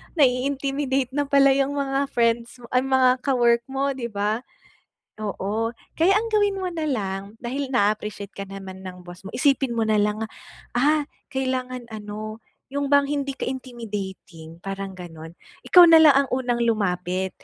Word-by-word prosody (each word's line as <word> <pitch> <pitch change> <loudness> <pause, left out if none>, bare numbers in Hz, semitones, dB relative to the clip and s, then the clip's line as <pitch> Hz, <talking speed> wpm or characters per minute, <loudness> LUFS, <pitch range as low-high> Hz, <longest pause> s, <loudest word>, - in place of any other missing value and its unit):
nai-intimidate 270 -1 +1
na 285 +1 -1
pala 275 0 +5
yung 275 +1 +1
mga 275 0 0
friends 235 -1 0
mo, 235 - -13
ay, 250 - +4
mga 260 -1 +3
ka-work 240 -3 +2
mo, 270 +1 -1
di 255 -3 -4
ba? 210 +1 -1 0.8
Oo, 215 +2 -2 0.2
kaya 340 +4 +4
ang 430 +3 +1
gawin 410 -3 +1
mo 370 - -1
na 335 -3 -4
lang, 195 -9 -2 0.2
dahil 265 +3 -4
na-a-appreciate 210 -2 -1
ka 200 - -4
naman 190 -1 -9
ng 180 -1 -8
boss 175 +1 -12
mo, 195 - -8
isipin 270 -2 +2
mo 230 - -1
na 215 - +3
lang, 210 +1 +1 0.6
ah, 295 +3 +2 0.2
kailangan 255 -2 -2
ano, 215 0 -7 0.3
yung 280 +1 -2
bang 285 -1 +5
hindi 280 -1 -2
ka - - -3
intimidating, 205 -10 -7
parang 195 +2 -5
gano'n. 165 -4 -10 0.4
Ikaw 360 -1 +10
na 325 -1 +8
lang 300 -3 +8
ang - - -19
unang 245 -2 0
lumapit 190 -5 0
245 Hz, 160 wpm, -24 LUFS, 205-275 Hz, 0.8 s, Ikaw